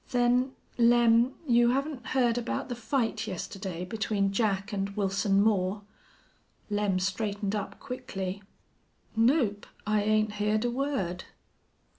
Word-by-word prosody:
"Then, 250 +1 +2 0.3
Lem 235 +1 +5
you 240 -1 +5
haven't 275 -3 -3
heard 245 -3 +2
about 245 +1 -3
the 245 - -3
fight 225 -2 -1
yesterday 185 -2 -5
between 200 0 -1
Jack 200 -1 0
and 195 0 -1
Wilson 195 0 +2
Moore?" 205 -1 +1 0.9
Lem 205 -2 +1
straightened 200 +2 -2
up 200 -1 -4
quickly. 200 -7 -5 0.7
"Nope, 225 -3 +2 0.2
I 215 0 +2
'ain't 215 0 +2
heerd 210 +2 0
a 240 - +1
word." 250 -9 -2
215 Hz, 120 wpm, -29 LUFS, 195-240 Hz, 0.9 s, Lem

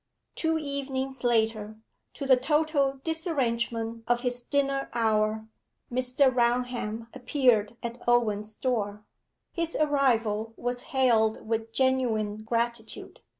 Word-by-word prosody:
Two 320 -1 0
evenings 270 -3 -4
later, 220 -2 +1 0.4
to 280 - -5
the 265 -1 +7
total 280 0 +1
disarrangement 235 -8 -1
of 240 0 +2
his 245 -1 -1
dinner 275 +1 0
hour, 220 -1 +1 0.5
Mr. 255 +2 +2
Raunham 240 -2 0
appeared 245 -5 +2
at 235 +1 -5
Owen's 215 -3 +1
door. 210 -5 -2 0.5
His 335 -1 -3
arrival 230 -7 +1
was 245 0 -3
hailed 230 -5 +2
with 225 0 -2
genuine 230 -5 +1
gratitude. 230 +1 -3
240 Hz, 105 wpm, -28 LUFS, 225-270 Hz, 0.5 s, the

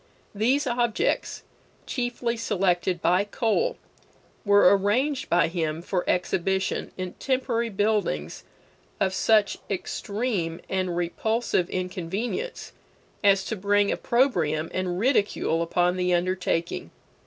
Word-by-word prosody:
These 250 +8 +1
objects, 240 -3 0 0.4
chiefly 245 -1 -2
selected 185 -5 0
by 180 +3 +4
Cole, 240 - 0 0.7
were 200 -2 +6
arranged 255 +8 0
by 175 0 +4
him 165 -1 -2
for 180 0 -1
exhibition 190 +1 0
in 185 -1 -4
temporary 250 -3 0
buildings 205 - -1 0.6
of 190 - +1
such 215 +1 +3
extreme 200 -3 -2
and 185 -2 -1
repulsive 185 +2 0
inconvenience 190 - -4 0.5
as 195 -1 +4
to 220 - -3
bring 205 +1 +2
opprobrium 165 - +1
and 185 -1 -2
ridicule 205 - +1
upon 175 +2 +1
the 180 -1 +2
undertaking. 175 - -1
195 Hz, 105 wpm, -25 LUFS, 175-230 Hz, 0.7 s, were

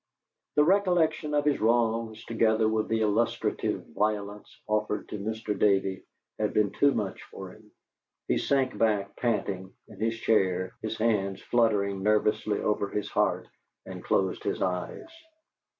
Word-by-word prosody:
The 150 - +6
recollection 170 -4 +2
of 145 0 +1
his 145 -1 +1
wrongs, 115 -1 +1
together 110 -1 +2
with 110 0 0
the 110 0 0
illustrative 110 +2 0
violence 105 0 -2 0.2
offered 105 0 -1
to 105 - -5
Mr. 110 0 -3
Davey, 95 -1 +2 0.4
had 105 -1 -1
been 105 -2 +3
too 140 - +3
much 105 -7 -3
for 95 -1 -9
him. 105 +2 -18 0.6
He - - +1
sank 135 -2 +1
back, 105 -3 0
panting, 100 -5 -2
in 105 -4 -14
his 115 +1 0
chair, 95 -5 +1
his 110 0 -4
hands 100 -4 0
fluttering 105 -5 +1
nervously 105 0 +1
over 100 -1 0
his 105 - -3
heart, - - +1 0.4
and - - -8
closed 95 -1 0
his - - -2
eyes. 90 - -2
110 Hz, 145 wpm, -28 LUFS, 100-115 Hz, 0.6 s, The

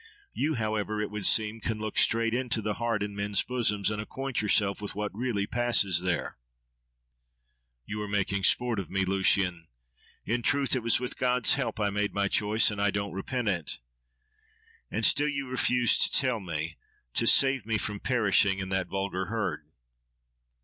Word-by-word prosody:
You, 155 +1 0
however, 110 -2 -2
it 105 -1 -3
would 105 -2 -1
seem, 110 0 +2
can 110 0 -2
look 110 -1 -5
straight 115 0 +2
into 125 -2 0
the 105 -1 -2
heart 115 -3 0
in 105 0 -5
men's 100 0 +1
bosoms, 110 -5 -1
and 105 0 -3
acquaint 135 +4 -3
yourself 100 -1 +1
with 105 - -4
what 105 -1 -3
really 110 -2 -2
passes 100 -7 +1
there. 90 -1 -2 1.5
—You 105 0 -5
are 105 - -4
making 100 -1 -1
sport 120 -3 +2
of 95 - -6
me, 95 0 0
Lucian! 95 -3 +1 0.6
In 120 +2 0
truth, 140 +2 +1
it 130 - -1
was 115 +1 +2
with 125 0 -5
God's 125 -2 +3
help 130 -4 -2
I 105 -1 +1
made 105 +1 -1
my 100 0 +2
choice, 105 +3 +2
and 100 -1 -4
I 100 - +3
don't 100 0 -3
repent 120 +5 -3
it. 85 -6 -2 1.1
—And - - 0
still 145 +1 +4
you 140 -2 -3
refuse 125 -1 +2
to - - +3
tell 130 -4 +2
me, 80 -3 -5 0.4
to - - +1
save 135 -5 +4
me 110 -1 +1
from 105 0 -4
perishing 100 -5 +2
in 95 -1 -4
that 95 -1 -1
'vulgar 95 -1 -2
herd. 110 +1 -3
105 Hz, 175 wpm, -28 LUFS, 100-120 Hz, 1.5 s, still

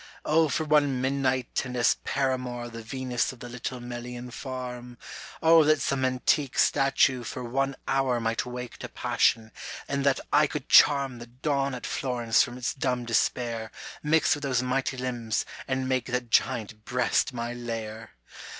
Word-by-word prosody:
O 160 0 +3
for 140 +4 0
one 145 -4 +3
midnight 130 -1 0
and 125 -1 -5
as 120 - +4
paramour 125 -3 -1
The 115 0 -8
Venus 125 +1 -2
of 130 - -14
the 120 - -8
little 125 +1 -5
Melian 120 0 -7
farm! 125 -1 -6 0.5
O 165 0 +7
that 155 0 +4
some 135 -1 0
antique 130 +2 +1
statue 135 -2 +3
for 125 +2 -5
one 135 +3 -1
hour 135 -2 +1
Might 115 -1 -1
wake 125 -1 -7
to - - -7
passion, 110 -1 +1 0.4
and 140 -1 -1
that 140 -1 +3
I - - +5
could - - -5
charm 135 -4 +5
The 120 - -9
Dawn 135 +2 -1
at 125 - -7
Florence 120 -2 +1
from 120 -2 -2
its 125 - -2
dumb 125 -3 -1
despair 115 -1 0 0.3
Mix 160 +3 +3
with 145 - -4
those 130 -3 0
mighty 130 +1 -1
limbs 120 -3 -2 0.2
and 130 -1 -1
make 130 -1 0
that 125 -2 -3
giant 110 -2 +1
breast 125 +3 +1
my 120 -1 -4
lair 115 - -6
125 Hz, 165 wpm, -27 LUFS, 120-135 Hz, 0.5 s, O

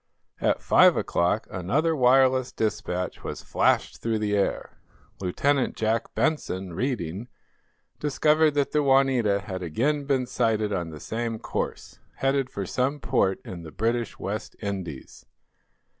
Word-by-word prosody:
At - - +1
five - - +6
o'clock 90 +6 +1
another 140 - 0
wireless 130 -1 +4
despatch 90 -4 -2
was - - -6
flashed - - +1
through 115 -1 0
the 105 -1 0
air. 100 - -1 0.4
Lieutenant 130 +9 +1
Jack 110 +1 -1
Benson, 95 - -1
reading, 110 - -3 0.7
discovered 150 +1 +3
that 145 -1 +1
the 150 - +2
"Juanita" 135 -7 +3
had 95 -3 -6
again 140 - 0
been 135 -3 +1
sighted 110 -4 0
on 85 -4 -2
the 75 -1 -9
same 115 +3 -3
course, - - -5 0.2
headed 135 -1 0
for 100 - -4
some 130 +9 -1
port 105 -8 +1
in 90 -2 -7
the 80 - -9
British 115 +5 -1
West 105 +2 -5
Indies. 95 -9 -6
115 Hz, 135 wpm, -26 LUFS, 95-135 Hz, 0.7 s, five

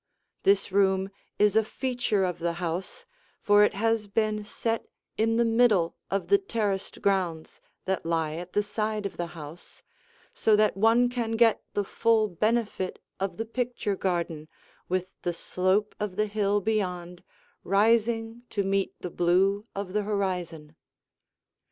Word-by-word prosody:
This 200 0 +3
room 190 0 +2 0.3
is 210 0 +3
a 220 - +5
feature 245 -3 -1
of 180 -2 -2
the 170 0 -1
house, 180 - -4 0.3
for 205 0 +5
it 210 - +2
has 225 0 +1
been 215 0 0
set 225 +2 -3 0.3
in 225 +1 +1
the 235 +1 +3
middle 225 -7 +3
of 195 0 -1
the 400 - +6
terraced 210 - -3
grounds 180 -5 -1 0.2
that 190 -1 -1
lie 165 -2 0
at 175 +3 -7
the 205 - +2
side 215 0 -2
of 200 - -5
the 175 - -2
house, 155 +3 -11 0.5
so 220 - +3
that 215 0 +3
one 225 +4 +4
can 240 -2 -2
get 225 0 +4
the 205 - +1
full 220 +2 +2
benefit 215 0 -1 0.2
of 190 -3 -3
the 225 - -2
picture 235 -3 -2
garden 170 -5 -2 0.4
with 185 0 -1
the 175 - -1
slope 185 +4 0
of 210 -3 -3
the 215 +2 +1
hill 205 -1 0
beyond 180 -4 -2 0.4
rising 225 +3 +2
to 200 - -1
meet 195 0 0
the 180 - -5
blue 195 +5 +2
of 195 -2 -4
the 210 - +1
horizon. 180 -7 -3
200 Hz, 150 wpm, -27 LUFS, 185-220 Hz, 0.5 s, the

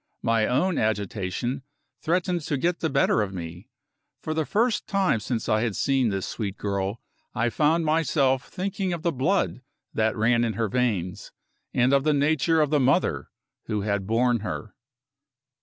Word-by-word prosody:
My 115 -1 +2
own 165 +8 +1
agitation 110 +4 -2 0.4
threatened 175 +1 0
to 145 - 0
get 170 +5 0
the 160 - 0
better 135 -5 +3
of 100 -2 -3
me. 85 +1 -8 0.5
For 155 - -3
the 155 -1 -1
first 230 +1 +1
time 195 - +2
since 115 +2 -3
I 110 0 +2
had 115 -4 -1
seen 135 -4 +2
this 95 -2 -2
sweet 100 -3 -4
girl, 100 +1 -2 0.4
I 120 0 +1
found 160 +5 +2
myself 145 -4 +2
thinking 190 0 -3
of 170 -2 -5
the 170 - +2
blood 145 +1 0 0.3
that 110 +1 +1
ran 120 +2 +3
in 115 -2 0
her 110 +1 -1
veins, 100 -7 -1 0.4
and 125 +2 +2
of 140 -1 +4
the 155 0 +3
nature 155 +2 +2
of 150 -1 +1
the 150 - +3
mother 135 +7 +1 0.4
who 105 -2 -2
had 100 -2 -1
borne 120 +2 +2
her. 105 0 -5
125 Hz, 170 wpm, -25 LUFS, 110-155 Hz, 0.5 s, of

